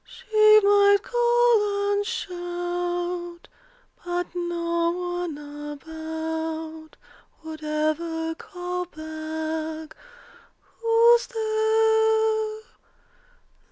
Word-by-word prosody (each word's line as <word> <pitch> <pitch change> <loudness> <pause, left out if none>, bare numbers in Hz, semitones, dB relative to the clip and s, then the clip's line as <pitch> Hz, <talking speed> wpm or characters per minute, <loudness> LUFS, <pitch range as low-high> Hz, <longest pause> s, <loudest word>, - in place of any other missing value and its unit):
She 430 0 +4
might 405 0 +6
call 475 -4 +2
and 405 0 +1
shout, 350 -1 -4 0.6
But 350 0 -3
no 340 -1 -1 0.4
one 295 - -7 0.4
about 320 +1 -6 0.5
Would 315 -1 -8
ever 320 +2 -1
call 360 +1 -5
back, 315 0 -5 0.8
"Who's 465 +1 +5
there?" 440 -1 +2
350 Hz, 65 wpm, -25 LUFS, 320-435 Hz, 0.8 s, might